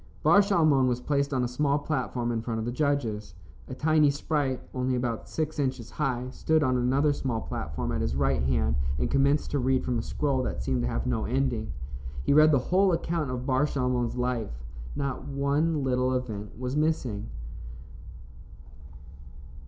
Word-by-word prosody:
Bar 200 - +6
Shalmon 155 -10 +3
was 125 -1 0
placed 140 +2 0
on 130 -2 +1
a - - +1
small 140 +3 +1
platform 130 -5 -2
in 115 -1 -1
front 115 0 -3
of 110 - -2
the 120 - -2
judges. 120 - -1 0.3
A 130 - -6
tiny 155 0 +4
sprite, 140 -2 -1
only 130 0 0
about 120 -2 -3
six 155 -1 -2
inches 130 -4 -2
high, 130 -4 -2
stood 160 +3 +1
on 130 -2 +2
another 135 +4 +2
small 130 -5 -2
platform 70 -4 -4
at - - -1
his 65 - -1
right 70 0 +1
hand 65 -1 +1 0.2
and 60 -3 -1
commenced 140 +2 +2
to 145 - +1
read 130 0 +1
from 125 -2 0
a - - -1
scroll 140 +1 -1
that 60 - -3
seemed 60 0 0
to - - 0
have - - -2
no 120 -3 0
ending. 125 -3 -1 0.5
He - - +3
read 155 +1 +7
the 145 - +5 0.2
whole 190 0 +5
account 165 -3 -1
of 125 0 -4
Bar 130 +2 +2
Shalmon's 125 -4 -1
life. 120 - -2 0.3
Not 135 -1 -3
one 145 +2 0
little 130 0 +1
event 105 -6 -4
was 125 +2 -3
missing. 130 -9 0
130 Hz, 175 wpm, -27 LUFS, 120-145 Hz, 0.5 s, read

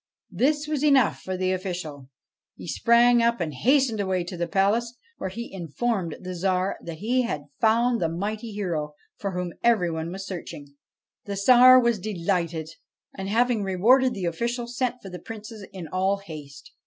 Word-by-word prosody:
This 290 - +1
was 300 -2 -1
enough 275 -6 +3
for 185 0 -4
the 185 0 0
official: 175 -8 -5 0.5
he - - -10
sprang 240 0 +4
up 235 -1 +2
and 160 -4 -2
hastened 255 - +2
away 190 -2 0
to 175 +1 -7
the 170 0 -2
palace, 215 +7 +1 0.2
where 190 - -3
he 230 +4 -7
informed 185 +1 -2
the 185 0 -6
Tsar 185 +1 -1
that 165 -1 -7
he 245 +8 +1
had 150 -12 -3 0.2
found 235 +2 +3
the 165 - +1
mighty 210 +6 -4
hero 165 -8 -3 0.2
for 200 -1 -4
whom 180 -1 -3
every 215 -8 +3
one 160 +1 -4
was 195 +1 -6
searching. 150 -6 -8 0.5
The 200 - -4
Tsar 250 +5 +7
was 235 -3 +1
delighted; 170 -5 -2 0.5
and 195 0 -5
having 235 +1 +2
rewarded 235 +7 +3
the 190 -3 -3
official, 235 +8 -2
sent 245 +1 -2
for 195 - -9
the 180 - -7
Princes 215 +1 -9
in 180 -4 -8
all 190 +4 0
haste. 150 -8 -11
195 Hz, 175 wpm, -25 LUFS, 175-235 Hz, 0.5 s, Tsar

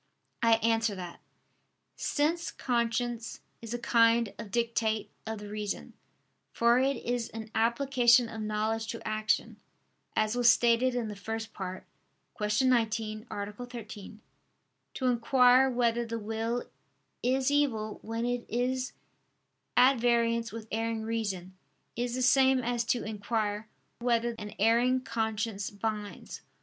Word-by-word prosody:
I 230 -1 +5
answer 225 -2 +2
that, 180 -2 -8 0.8
Since 325 +3 0
conscience 235 -1 -1 0.2
is 230 -1 -8
a - - -1
kind 230 -2 +3
of 210 - -7
dictate 230 -1 0 0.2
of 220 0 -3
the 210 0 -8
reason, 210 -1 -4 0.6
for 235 +1 +4
it 270 0 +1
is 240 -1 -1
an 220 0 -8
application 240 +1 +4
of 225 -1 -7
knowledge 215 +1 -1
to 230 0 -6
action, 215 0 0 0.6
as 215 +1 +1
was 245 -1 +5
stated 240 +2 +4
in 240 -2 -1
the 210 - -6
First 225 +2 -5
Part 185 -1 -6 0.5
(Q. 210 +4 +1
19, 225 -2 0
A. 205 0 -4
13), 220 -3 -9 0.7
to 260 - -3
inquire 250 +1 +5
whether 240 -1 +1
the 230 0 -4
will 225 +2 -2 0.6
is 260 +2 +1
evil 230 -8 0
when 225 +1 -3
it 245 0 -1
is 255 +2 -1 0.8
at 255 +1 +6
variance 235 -1 +2
with 225 0 -8
erring 225 0 -1
reason, 200 -5 -3 0.4
is 240 +1 -2
the 255 - -1
same 265 +1 +5
as 240 0 0
to 240 0 0
inquire 215 0 -2 0.3
"whether 235 -1 +1
an 210 -1 -7
erring 240 +4 +3
conscience 220 -3 -2
binds." 210 0 -5
230 Hz, 135 wpm, -30 LUFS, 215-245 Hz, 0.8 s, at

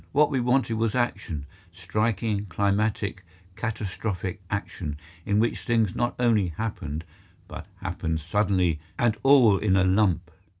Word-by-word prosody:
What 150 +1 +4
we 135 - +1
wanted 125 -2 +1
was 115 0 0
action—striking, 100 - -2
climatic, 100 +1 0 0.3
catastrophic 100 -4 -3
action, 90 -7 -4 0.3
in 105 - +2
which 115 +2 +1
things 115 -5 +1
not 120 0 0
only 115 -6 +3
happened, 80 -4 -4 0.4
but - - -8 0.2
happened 80 -2 -2
suddenly 90 -1 +1 0.2
and 120 -2 +2
all 125 -7 +6
in 100 -3 +2
a 95 - +4
lump. 95 -2 +2
100 Hz, 125 wpm, -26 LUFS, 90-115 Hz, 0.4 s, all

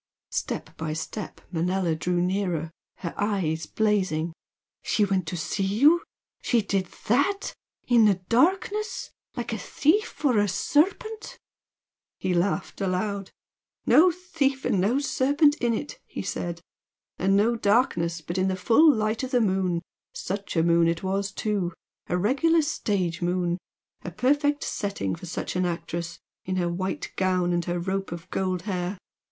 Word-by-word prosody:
Step - - -3
by 160 -1 -3
step 175 +6 -6
Manella 180 0 0
drew 175 +3 0
nearer, 180 -4 -1 0.3
her 170 -3 -4
eyes 185 -6 -1
blazing. 185 -7 0 0.5
"She 210 - +2
went 190 -4 0
to 175 - -3
see 170 +5 -2
you? 280 - +5 0.4
She 235 -4 +2
did 195 -2 0 0.2
THAT! 375 - +1 0.3
In 235 -3 +6
the 205 -2 +5
darkness? 370 - 0 0.3
like 235 -1 -3
a 220 - -3
thief 315 - +1
or 245 -6 +4
a 205 - +3
serpent!" 400 - 0 0.8
He 185 -1 -1
laughed 190 +3 -1
aloud. 195 +1 -1 0.6
"No 305 +10 +7
thief 305 -7 -1
and 190 - +2
no 220 +8 +2
serpent 290 +1 +3
in 240 -4 +1
it!" 290 - -6
he - - -5
said 170 -1 -4 0.6
"And 195 +2 +3
no 225 +4 +3
darkness, 200 -7 +1
but 170 +3 -3
in 185 - +2
the 190 - 0
full 235 - +5
light 215 -2 0
of 260 - -3
the 250 -2 +3
moon! 190 -5 +1 0.3
Such 200 +1 -4
a 165 - +3
moon 170 0 +4
it 170 +2 -1
was, 195 +1 -1
too! 195 -4 -1 0.3
A 180 - 0
regular 295 - +3
stage 190 - -1
moon! 175 0 0 0.4
A - - -4
perfect 290 - +1
setting 200 - -2
for 180 - -7
such 170 - -4
an 180 - +1
actress, 170 0 -4 0.3
in 185 - -2
her 175 -2 +1
white 185 +2 -3
gown 185 -2 +2
and 175 0 0
her 175 0 -1
rope 190 +2 -2
of 170 0 -7
gold 185 -2 -1
hair! 185 -1 -2
195 Hz, 155 wpm, -26 LUFS, 175-240 Hz, 0.8 s, No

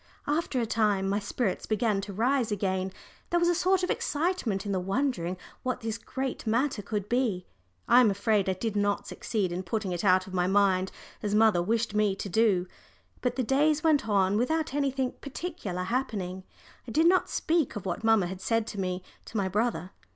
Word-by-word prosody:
After 295 -3 0
a 235 - +1
time 210 -4 +1
my 200 +1 +1
spirits 205 0 -2
began 215 -2 +1
to 200 - -6
rise 235 +3 +1
again 190 -2 -1 0.4
there 345 - +2
was 345 0 +3
a - - +4
sort 370 +2 +2
of 360 - +1
excitement 290 - -1
in 200 - -2
the 190 - +1
wondering 190 -3 -1 0.2
what 255 -1 -2
this 225 0 -3
great 260 0 -4
matter 235 +1 +1
could 205 -1 -3
be. 235 -7 0 0.4
I 245 - +7
am 235 - +5
afraid 200 0 +1
I - - +2
did 210 +3 -3
not 205 0 +1
succeed 200 -6 -2
in 175 +1 -2
putting 195 +1 -2
it 175 -1 -3
out 185 -1 +4
of 190 - -11
my 180 -1 +1
mind 190 -1 +3 0.3
as 205 0 -1
mamma 215 -5 +5
wished 225 +4 0
me 210 -2 +2
to 200 - -5
do. 195 -3 +3 0.6
But 250 - 0
the 260 - 0
days 295 +5 +2
went 290 -8 +3
on 195 -1 +3
without 310 +5 0
anything 270 -2 0
particular 250 - -5
happening. 190 -5 -3 0.4
I - - -6
did 315 +7 +3
not 365 +2 +4
speak 325 -4 0
of 205 - -6
what 180 +3 -3
mamma 225 -4 +4
had 185 +1 -6
said 225 +2 +1
to 205 - -6
me 185 -1 -2 0.2
to 225 - -6
my 195 -2 +1
brother. 190 -3 -1
215 Hz, 200 wpm, -28 LUFS, 190-255 Hz, 0.6 s, I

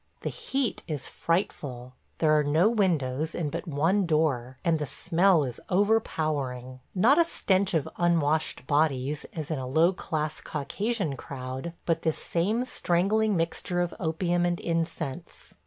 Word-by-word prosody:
The - - -2
heat 270 -3 -2
is 150 -4 -4
frightful.... 130 -8 -2 0.2
There 155 -2 +3
are 150 -1 +4
no 155 +8 +4
windows 160 - 0
and 155 -4 -2
but - - -5
one 170 +6 +2
door, 135 -6 +1
and 165 -2 +3
the 150 - -2
smell 175 +1 +3
is 125 -3 -5
overpowering. 155 - 0 0.2
Not 240 - +5
a - - +7
stench 190 - +1
of 155 - +1
unwashed 160 -5 +1
bodies, 145 -1 +1
as 155 -2 -5
in 155 - -1
a 130 - -4
low 160 +7 +4
class 155 -4 -3
Caucasian 200 - -2
crowd, 130 +5 -6
but 165 -1 +1
this 160 -2 0
same 210 +9 0
strangling 205 +2 +1
mixture 170 +1 -1
of 175 -1 0
opium 175 +1 0
and 175 0 0
incense. 165 -1 -4
165 Hz, 150 wpm, -27 LUFS, 145-180 Hz, 0.2 s, a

